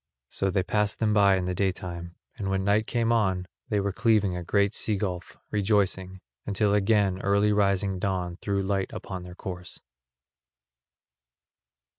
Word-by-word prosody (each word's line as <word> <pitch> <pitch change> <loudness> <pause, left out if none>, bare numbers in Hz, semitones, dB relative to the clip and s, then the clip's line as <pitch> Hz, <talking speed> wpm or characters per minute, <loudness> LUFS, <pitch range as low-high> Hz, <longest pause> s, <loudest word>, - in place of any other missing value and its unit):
So 95 - 0
they 95 -1 +1
passed 105 +1 0
them 110 -2 +1
by 100 -2 +5
in 90 - -2
the 90 - -1
day 95 +1 +1
time, 85 -2 -7 0.2
and 100 -2 -3
when 95 0 0
night 105 +2 +2
came 115 -1 +1
on 95 -6 +1 0.2
they 105 - +1
were 100 0 0
cleaving 105 -4 +2
a 90 - -4
great 100 +3 +2
sea 110 - 0
gulf, 95 -3 -4
rejoicing, 95 -3 0 0.2
until 100 0 +1
again 100 -2 +2
early 100 +1 +3
rising 100 -2 +1
dawn 90 -2 -2
threw 100 0 -1
light 95 0 -1
upon 95 -2 -6
their 90 0 -10
course. 90 -2 -7
100 Hz, 160 wpm, -27 LUFS, 95-105 Hz, 0.2 s, by